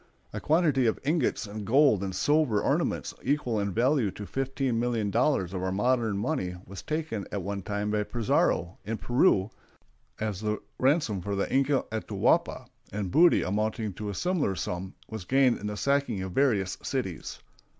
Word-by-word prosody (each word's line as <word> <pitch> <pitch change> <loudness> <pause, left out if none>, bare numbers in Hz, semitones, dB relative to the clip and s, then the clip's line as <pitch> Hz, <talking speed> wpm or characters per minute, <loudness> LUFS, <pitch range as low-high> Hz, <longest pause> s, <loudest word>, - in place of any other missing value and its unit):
A - - -3
quantity 150 -6 +2
of 110 - 0
ingots 150 -5 0
and 105 +1 -6
gold 120 -3 +4
and 95 -1 -4
silver 145 0 +2
ornaments - - 0
equal 125 -6 0
in 100 -1 -1
value 120 +2 +2
to 100 +2 -8
fifteen 135 -1 -1
million 115 -4 0
dollars 115 - +1
of 95 - -3
our 95 0 -1
modern 115 +1 +1
money 100 - -2
was 95 +1 -8
taken 155 -10 -3
at 100 -3 -3
one 100 +1 -3
time 105 +2 -2
by 105 0 +1
Pizarro, 105 -5 0
in 110 +1 -3
Peru, 120 - +2 0.7
as 105 -3 -3
the 105 0 -1 0.2
ransom 130 - +2
of 100 0 -2
the 100 - -1
Inca 135 +1 +2
Atahualpa, 110 0 0 0.3
and 100 -3 -3
booty 170 +2 +5
amounting 105 +1 -1
to 105 +3 -5
a 100 - -4
similar 170 - 0
sum 90 +1 -4
was 110 -4 -6
gained 130 +4 +3
in 105 - -4
the 105 0 -4
sacking 140 -8 0
of 95 - -5
various 100 -6 +1
cities. 120 - -4
110 Hz, 170 wpm, -28 LUFS, 100-135 Hz, 0.7 s, booty